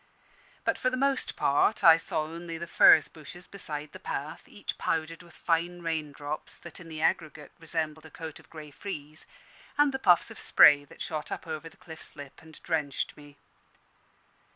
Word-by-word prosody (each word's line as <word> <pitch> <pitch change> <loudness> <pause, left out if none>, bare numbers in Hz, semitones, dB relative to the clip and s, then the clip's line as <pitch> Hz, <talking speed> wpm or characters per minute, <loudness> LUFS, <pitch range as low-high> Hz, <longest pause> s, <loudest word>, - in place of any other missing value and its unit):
But - - +1
for 255 - +2
the 255 - -3
most 275 0 +1
part 145 +10 +2
I 165 -1 +10
saw 155 -1 -2
only 165 +1 -7
the 170 - -5
furze 160 -1 +7
bushes 165 +4 -12
beside 150 -6 -7
the - - -11
path, - - -5
each - - -6
powdered 165 +1 -2
with 170 -1 -17
fine 175 +1 -1
raindrops, 150 -2 -4
that 170 +1 -10
in 170 -2 -11
the 155 0 -5
aggregate 155 -2 -1
resembled 160 -1 -2
a - - -15
coat 160 0 -8
of - - -20
grey 155 -2 -10
frieze, 155 -2 -7 0.5
and 290 -1 +4
the 265 - -2
puffs 175 -8 +4
of - - -10
spray 145 -1 +6
that - - -9
shot 155 -3 -5
up - - -5
over 160 0 -6
the - - -22
cliff's 160 -2 -5
lip 140 -1 -11
and 160 -1 -15
drenched 150 -4 -2
me. 145 -1 -15
160 Hz, 180 wpm, -28 LUFS, 150-170 Hz, 0.5 s, I